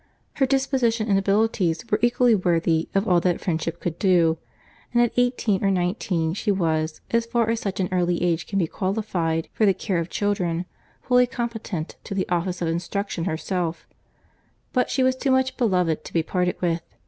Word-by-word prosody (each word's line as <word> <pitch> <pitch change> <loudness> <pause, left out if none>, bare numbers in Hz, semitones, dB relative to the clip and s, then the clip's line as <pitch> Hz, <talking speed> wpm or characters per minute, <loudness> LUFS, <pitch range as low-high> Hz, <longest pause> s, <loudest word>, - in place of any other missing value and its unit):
Her 270 - +3
disposition 255 -4 +1
and 195 -1 +4
abilities 195 -2 +1
were 210 - +3
equally 240 0 +4
worthy 170 -4 +1
of 195 +2 +2
all 180 -2 +4
that 175 -1 +1
friendship 165 -1 -2
could 170 -1 -4
do; 170 -4 +3 0.5
and 240 - +2
at 240 - +1
eighteen 245 -5 +1
or 195 - +3
nineteen 175 -3 0
she 210 +2 0
was, 160 -4 -1
as 230 0 +1
far 230 -1 +1
as 230 - -1
such 195 -3 -4
an 185 - +1
early 175 -1 +1
age 170 -2 0
can 195 - -2
be 180 - +3
qualified 185 -4 -2
for - - 0
the 195 -3 +4
care 190 -2 -1
of 165 +1 -3
children, 180 -4 -1 0.4
fully 250 -1 +4
competent 225 -9 -4
to 200 - -5
the 190 - -1
office 180 0 -1
of - - 0
instruction 175 +1 -2
herself; 170 -1 -2 0.9
but 250 -2 +1
she 260 - +1
was 260 0 +3
too 270 +1 -2
much 260 0 +2
beloved 180 - +1
to - - -10
be 165 - +2
parted 180 +1 -1
with. 170 -1 +1
190 Hz, 185 wpm, -24 LUFS, 170-225 Hz, 0.9 s, and